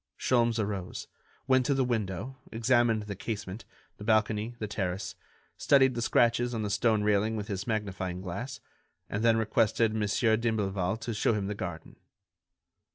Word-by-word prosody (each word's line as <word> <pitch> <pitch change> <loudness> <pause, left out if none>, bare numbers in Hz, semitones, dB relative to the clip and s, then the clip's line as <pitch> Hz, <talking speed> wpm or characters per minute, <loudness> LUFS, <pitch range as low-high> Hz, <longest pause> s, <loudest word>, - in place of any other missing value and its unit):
Sholmes 120 -2 +2
arose, 100 -4 -3 0.4
went 130 -1 +4
to 140 - +2
the 135 - +2
window, 115 +2 -3
examined 115 -1 +2
the 105 -1 -6
casement, 105 0 -5 0.3
the - - -9
balcony, 110 +1 +1
the 110 - -3
terrace, 95 -2 -3 0.4
studied 135 -2 +4
the 120 - -3
scratches 120 +1 +2
on 110 - -2
the 105 - -2
stone 110 0 +2
railing 105 +1 +2
with 105 0 -4
his 100 -1 -3
magnifying 95 -4 -2
glass, 100 +8 -6 0.5
and 105 +3 -1
then 115 -1 +5
requested 110 0 +2
Mon. 110 -1 0 0.3
d'Imblevalle 105 -4 0
to 115 - -3
show 105 +2 +2
him 100 -2 -2
the 105 - -2
garden. 90 -5 -7
110 Hz, 160 wpm, -29 LUFS, 100-115 Hz, 0.5 s, then